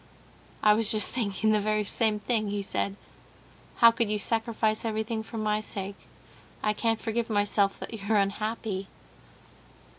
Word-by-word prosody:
"I 210 - +7
was 220 0 +1
just 215 -1 +3
thinking 215 -2 0
the 215 - +3
very 215 0 0
same 215 0 +2
thing," 215 0 -1
he 205 0 -2
said; 195 0 -2 0.8
"how 230 0 +7
could 230 -1 -1
you 210 - 0
sacrifice 220 0 0
everything 220 0 -2
for 225 +1 -8
my 215 -1 0
sake? 200 -1 -6 0.6
I 210 - +2
can't 225 +1 0
forgive 230 0 -2
myself 205 -1 +1
that - - -6
you're 215 0 0
unhappy!" 200 0 -2
215 Hz, 150 wpm, -28 LUFS, 205-225 Hz, 0.8 s, I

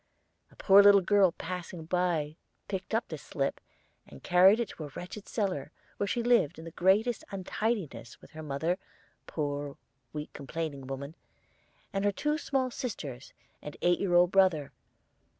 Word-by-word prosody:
A - - -22
poor 200 0 +7
little 200 -1 +7
girl 195 -1 +4
passing 175 -1 -6
by 165 -4 0 0.3
picked 195 +2 -3
up 225 - 0
this 155 -4 -7
slip, 140 -2 -2 0.5
and 70 - -14
carried 190 +5 +6
it 235 -5 -1
to 155 - -7
a - - -7
wretched 180 +8 -8
cellar, 185 - -2 0.3
where 200 - -1
she 235 +3 -1
lived 235 -10 +3
in 160 - -9
the 165 - -8
greatest 205 +7 +2
untidiness 190 - -3
with - - -17
her 155 -1 -8
mother 155 +5 -1 0.4
a - - -15
poor, 145 -2 -3 0.3
weak, 150 0 -6
complaining 140 -1 -5
woman 140 +2 -6 0.8
and 195 0 -1
her 205 - +3
two 300 +10 -1
small 265 -4 -1
sisters 145 - -6 0.3
and 150 - -8
eight 175 0 +3
year 180 -3 +1
old 175 0 +5
brother. 185 -7 +3
175 Hz, 165 wpm, -30 LUFS, 150-200 Hz, 0.8 s, poor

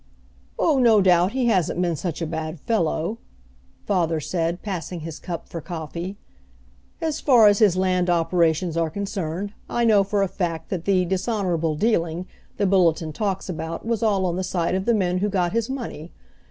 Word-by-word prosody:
"Oh, 300 -5 +3
no 230 -4 +5
doubt 180 +1 +4
he 260 -1 0
hasn't 185 -7 +1
been 175 -2 +1
such 170 +1 -4
a - - 0
bad 160 0 -4
fellow," 200 0 -1 0.7
father 170 -5 +1
said, 170 +2 -2
passing 180 -4 -4
his 160 0 -7
cup 170 -3 -6
for 165 - -6
coffee. 170 +3 -6 0.8
"As 320 -2 -2
far 245 -6 +6
as 205 -1 +5
his 200 -5 +4
land 185 -1 +1
operations 170 0 +1
are 165 -1 +1
concerned, 195 +1 -4 0.2
I 240 0 +1
know 210 -3 +5
for 200 0 0
a - - +1
fact 165 -3 -3
that 180 -4 -3
the 185 -2 +3
'dishonorable 180 -4 -1
dealing' 170 -3 0 0.3
the 205 - +1
Bulletin 170 -4 +2
talks 195 +1 -2
about 165 0 -5
was 230 -2 -1
all 200 -4 +2
on 175 -1 -1
the 190 - -1
side 180 -2 -1
of 190 +1 -1
the 235 - +3
men 180 -3 +1
who 205 +2 0
got 180 -3 0
his 230 +1 0
money. 230 - -6
185 Hz, 180 wpm, -23 LUFS, 165-205 Hz, 0.8 s, far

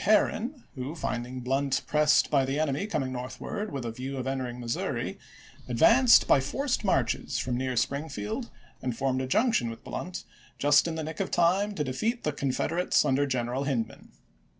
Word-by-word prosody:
Herron, 230 +5 +2
who, 135 +4 -5
finding 125 -4 -4
Blunt 135 +2 0
pressed 150 0 +3
by 140 -2 +4
the 135 +3 -1
enemy 155 +5 0
coming 135 -9 -2
north 125 0 -6
ward 210 0 -4
with 135 -3 -4
a 115 - -2
view 130 +4 -5
of 130 - -3
entering 130 -2 -3
Missouri, 120 -1 -3 0.5
advanced 230 - +6
by - - +6
forced 260 - -1
marches 130 - 0
from 125 0 -1
near 130 0 -1
Springfield 135 -5 -2 0.3
and 125 -3 -3
formed 130 -1 0
a 130 - -3
junction 215 - +2
with 115 - -9
Blunt 180 +1 -5 0.3
just 145 +3 +4
in 165 - -3
the 160 - -3
nick 160 +1 -6
of 195 - -1
time 190 +5 +2
to 150 - -1
defeat 220 - -2
the 150 - 0
Confederates 145 +6 +1
under 140 +2 +2
Greneral 130 +1 -1
Hindman. 120 -6 -3
140 Hz, 175 wpm, -28 LUFS, 130-170 Hz, 0.5 s, advanced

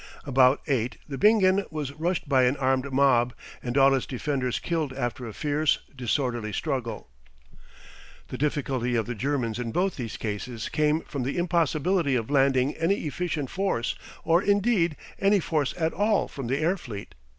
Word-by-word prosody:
About 130 -1 +4
eight 125 -5 -1
the 140 -3 -5
Bingen 200 -2 +5
was 150 -3 -4
rushed 165 +3 -2
by 130 -3 +4
an 125 +3 +1
armed 130 0 0
mob, 125 -3 +3 0.3
and 125 +2 -3
all 135 0 +6
its 135 - 0
defenders 130 -1 -1
killed 160 -6 -2
after 120 -2 -3
a - - -6
fierce, 150 +3 +1 0.2
disorderly 120 -2 -1
struggle. 120 - -3 1.2
The - - -5
difficulty 135 -4 0
of 115 -2 +1
the 120 - -4
Germans 120 -1 -1
in 120 -2 -3
both 185 +8 0
these 115 -5 -5
cases 110 +2 -4
came 150 +1 +1
from 140 - -5
the 130 +6 -2
impossibility 170 -2 +1
of 115 +2 -2
landing 135 -1 +3
any 170 +3 0
efficient 155 -3 -3
force 190 -11 -1 0.3
or, 170 +2 +3
indeed, 200 -5 +2 0.2
any 200 +1 +4
force 155 -5 0
at 160 -1 0
all 210 +2 +2
from 135 -4 -6
the 135 +3 0
air 165 +6 +1
fleet. 105 - -8
140 Hz, 165 wpm, -26 LUFS, 125-165 Hz, 1.2 s, all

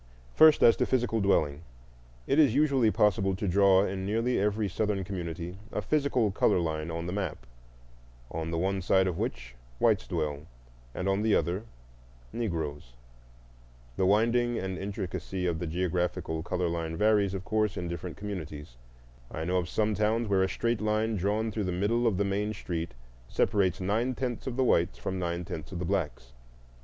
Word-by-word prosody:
First, 155 -1 +7
as 115 - +7
to - - +1
physical 120 -3 +1
dwelling. 75 -7 +2 0.6
It 140 - +2
is 140 -6 +5
usually 140 -6 +3
possible 95 -2 +2
to 100 +1 -3
draw 95 +1 +5
in 95 -1 -3
nearly 115 +5 0
every 105 +1 +1
Southern 100 +1 -1
community 90 -1 -5
a - - -2
physical 140 -8 +1
color 95 - +3
line 80 -1 -2
on 85 0 -4
the 90 - -3
map, 95 -11 -4 0.9
on 80 0 -3
the 85 - -2
one 95 +2 0
side 95 +1 +3
of 90 -3 -2
which - - -4 0.2
whites - - +2
dwell 75 +1 -3 0.5
and 90 - -2
on 95 +1 +1
the 110 -1 +3
other 90 +7 -1 0.7
Negroes. 80 - -3 1.0
The 95 - +1
winding 120 +4 +2
and 95 0 -3
intricacy 95 -2 -4
of 85 -2 0
the 85 - -3
geographical 85 -1 -1
color 90 +1 -1
line 85 -1 -3
varies, 105 -2 +3
of 95 0 -6
course, 110 -1 0
in 90 - -3
different 85 0 -6
communities. 75 -10 -7 0.5
I 80 - -5
know 90 +1 +1
some 105 +4 0
towns 110 +3 +1
where 100 -2 +2
a 95 - +2
straight 115 0 -1
line 110 +1 +1
drawn 105 +4 0
through 105 0 -2
the 90 - -1
middle 110 +7 +1
of 105 -5 +1
the 100 - +1
main 105 +2 -1
street 85 -8 -4 0.3
separates 95 -3 +1
nine 110 +7 0
tenths 125 -1 -3
of 125 - -3
the 130 - +3
whites 85 -8 +2
from 95 0 -4
nine 85 0 -2
tenths 80 -2 -7
of 90 - -5
the 90 - -3
blacks. 80 -10 -2
95 Hz, 175 wpm, -29 LUFS, 85-110 Hz, 1.0 s, First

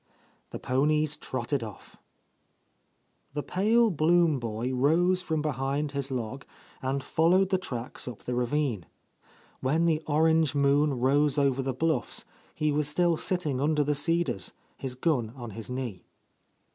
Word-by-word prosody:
The - - -6
ponies 150 +3 +1
trotted 130 -2 -3
off. 105 -4 -10 1.4
The 145 - -2
pale 220 +4 +3
Blum 165 -2 +3
boy 115 +2 -3
rose 170 +8 +3
from 160 -4 -2
behind 140 +1 -1
his 140 -1 -3
log 130 +1 -4 0.4
and 135 +1 -2
followed 180 +6 +3
the 190 -1 +2
tracks 125 -10 -5
up 120 -4 -8
the 125 - -3
ravine. 125 - -1 0.7
When 155 +6 +1
the 160 -2 +2
orange 160 -1 +3
moon 140 +1 +3
rose 140 +3 +3
over 135 -2 +2
the 135 0 -1
bluffs, 155 -3 -1 0.3
he 150 0 +1
was 150 0 0
still 170 +3 +2
sitting 155 -6 -1
under 150 0 +2
the 150 +1 +1
cedars, 165 - 0 0.2
his 130 -2 -5
gun 125 -5 0
on 120 -4 -7
his 110 +3 -7
knee. 125 -8 -4
145 Hz, 145 wpm, -28 LUFS, 130-160 Hz, 1.4 s, pale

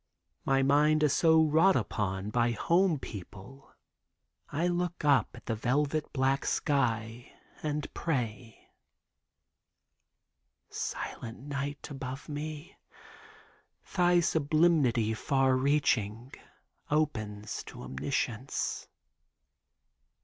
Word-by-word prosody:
My 135 0 +3
mind 150 +2 +4
so 160 +1 +5
wrought 160 +5 +4
upon 100 -3 -2
by 120 +1 +2
home 170 +5 +2
people 110 +4 -10 0.8
I 155 +4 -1
look 175 -2 -1
up 140 -7 +4
at - - -13
the 115 - -1
velvet 140 +7 0
black 135 0 +1
sky, 120 -5 -1 0.3
and 150 -1 -2
pray: 120 -7 -4 2.0
Silent 115 -2 -5
night! 140 0 -4
Above 135 0 -6
me 150 +1 -6 1.2
Thy 175 -1 +4
sublimity 150 -8 +2
far 135 +3 +2
reaching 130 -4 +1 0.6
Opens 110 -9 -1
to - - -10
Omniscience! 125 - -3
140 Hz, 85 wpm, -30 LUFS, 115-155 Hz, 2.0 s, so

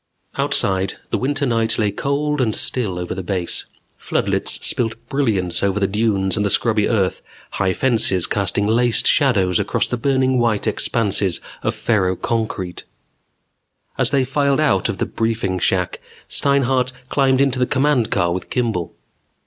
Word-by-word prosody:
Outside, 95 0 0 0.2
the - - +1
winter 145 +2 -1
night 115 -2 +1
lay 105 -2 +1
cold 140 +5 -1
and 110 -4 0
still 105 -8 0
over 90 0 -4
the 95 - -4
Base. 90 -2 -3 0.3
Floodlights - - -1
spilled 115 -2 0
brilliance 105 -11 0
over 100 0 +1
the 100 - +2
dunes 100 -2 0
and 105 - 0
the 100 - +1
scrubby 110 0 +2
earth, 100 -5 0 0.3
high 95 -2 0
fences 110 -7 +2
casting 100 0 0
laced 120 +2 +2
shadows 100 - +3
across - - 0
the 125 - -3
burning 130 0 +1
white 115 -4 +1
expanses 105 -4 0 0.2
of - - -1
ferroconcrete. 95 -1 -1 1.1
As 130 -2 +3
they 135 -1 +2
filed 140 +1 +1
out 135 -12 +2
of - - -3
the - - -1
briefing 110 -5 -2
shack, 90 0 0 0.3
Steinhart 130 -2 +2 0.2
climbed 135 -2 +2
into 135 -2 +2
the 125 - +2
command 135 -4 +1
car 85 -3 +1
with 90 -1 -5
Kimball. 110 -9 -2
115 Hz, 150 wpm, -20 LUFS, 95-130 Hz, 1.1 s, shadows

